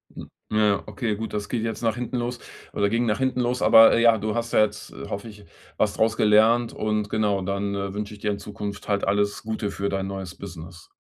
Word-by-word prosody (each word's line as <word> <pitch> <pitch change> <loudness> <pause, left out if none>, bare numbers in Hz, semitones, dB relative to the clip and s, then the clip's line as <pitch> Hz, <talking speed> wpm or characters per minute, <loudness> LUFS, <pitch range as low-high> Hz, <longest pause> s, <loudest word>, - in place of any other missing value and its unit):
Hm, - - -9 0.2
ja, 105 -2 +2
okay, 105 +1 -2
gut. 110 +2 -6
Das 105 -1 -3
geht 115 -2 -2
jetzt 115 -1 -3
nach 115 -2 +1
hinten 125 +1 -3
los, 120 0 -3 0.3
oder 100 0 +1
ging 115 +3 +1
nach 105 0 0
hinten 130 -1 0
los. 125 0 0
Aber, 115 0 +8
äh, 115 - +3
ja, 115 -1 +6
du 105 +1 -3
hast 120 -1 -3
ja - - +5
jetzt, 105 -1 -4
äh, - - -9
hoffe 100 +3 -5
ich, 105 -1 -14 0.3
was 105 -2 +1
draus 110 +1 +1
gelernt. 110 +3 +4
Und, 105 -1 -1
genau, 105 -3 +1
dann, 100 +2 -2
äh, 100 -1 -3
wünsche 105 0 -5
ich 105 - -12
dir 105 0 -1
in 100 - -4
Zukunft 105 -1 -7
halt 100 -1 0
alles 100 +1 0
Gute 110 -2 -3
für 100 +1 -2
dein 95 -1 -2
neues 95 -2 -6
Business. 85 -3 -10
105 Hz, 240 wpm, -24 LUFS, 100-115 Hz, 0.3 s, Aber